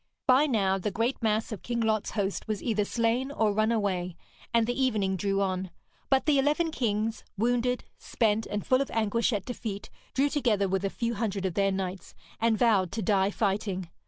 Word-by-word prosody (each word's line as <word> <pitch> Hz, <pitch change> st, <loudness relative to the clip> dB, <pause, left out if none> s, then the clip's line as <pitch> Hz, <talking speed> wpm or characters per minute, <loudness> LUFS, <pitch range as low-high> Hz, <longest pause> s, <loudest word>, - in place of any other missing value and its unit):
By 265 Hz, +3 st, +5 dB
now 195 Hz, -7 st, +1 dB
the 200 Hz, -, -1 dB
great 230 Hz, +7 st, -1 dB
mass 220 Hz, +1 st, 0 dB
of 215 Hz, -, -5 dB
King 240 Hz, -1 st, -3 dB
Lot's 220 Hz, -2 st, +1 dB
host 200 Hz, 0 st, -2 dB
was 215 Hz, -2 st, -3 dB
either 215 Hz, -3 st, +1 dB
slain 235 Hz, +5 st, 0 dB
or 220 Hz, -7 st, +1 dB
run 215 Hz, +2 st, +2 dB
away, 185 Hz, -5 st, -1 dB, 0.4 s
and 230 Hz, -1 st, +3 dB
the 245 Hz, +3 st, -1 dB
evening 205 Hz, -7 st, +1 dB
drew 195 Hz, +1 st, 0 dB
on; 185 Hz, -1 st, -2 dB, 0.4 s
but 270 Hz, -1 st, +3 dB
the 290 Hz, -3 st, +4 dB
eleven 300 Hz, +4 st, +1 dB
kings, 220 Hz, -4 st, -1 dB
wounded, 245 Hz, +3 st, +1 dB, 0.2 s
spent, 220 Hz, -1 st, 0 dB
and 205 Hz, -1 st, -3 dB
full 255 Hz, +1 st, +3 dB
of 275 Hz, -, -2 dB
anguish 225 Hz, +2 st, +1 dB
at 205 Hz, -4 st, -2 dB
defeat, 220 Hz, -5 st, -5 dB, 0.2 s
drew 275 Hz, +2 st, +3 dB
together 230 Hz, -9 st, +1 dB
with 190 Hz, +1 st, -1 dB
a 195 Hz, -, +1 dB
few 235 Hz, +3 st, -2 dB
hundred 205 Hz, -3 st, -2 dB
of 185 Hz, -, -1 dB
their 195 Hz, +1 st, +2 dB
knights, 190 Hz, -1 st, -4 dB, 0.2 s
and 230 Hz, -1 st, +2 dB
vowed 205 Hz, -7 st, +3 dB
to 220 Hz, 0 st, -2 dB
die 195 Hz, 0 st, +2 dB
fighting. 195 Hz, -4 st, -2 dB
215 Hz, 195 wpm, -28 LUFS, 195-235 Hz, 0.4 s, By